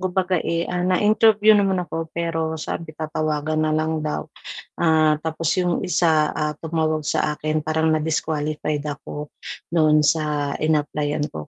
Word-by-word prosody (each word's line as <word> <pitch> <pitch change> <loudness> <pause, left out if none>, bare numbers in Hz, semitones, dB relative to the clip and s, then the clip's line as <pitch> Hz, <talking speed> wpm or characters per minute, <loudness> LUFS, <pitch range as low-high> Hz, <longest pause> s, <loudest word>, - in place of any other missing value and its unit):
kumbaga, 185 -1 0
eh, 170 0 -1
ah, 180 0 -3
na-interview 210 +3 +4
naman 195 -2 +3
ako 165 -1 -5
pero 165 -1 -1
sabi 155 0 -6
tatawagan 155 0 -1
na 155 0 +1
lang 155 0 -1
daw. 150 -1 -3 0.5
Ah, 155 -2 +3
tapos 160 +1 -1
yung 180 -2 +1
isa, 160 -4 +2
ah, 150 0 0
tumawag 155 -2 -1
sa 150 0 0
akin 155 0 -1
parang 160 +1 0
na-disqualified 155 -1 -1
ako 150 0 -6 0.4
doon 155 -2 +4
sa 150 -2 +1
in-applyan 150 -1 0
ko 75 -1 -7
155 Hz, 140 wpm, -22 LUFS, 150-170 Hz, 0.5 s, na-interview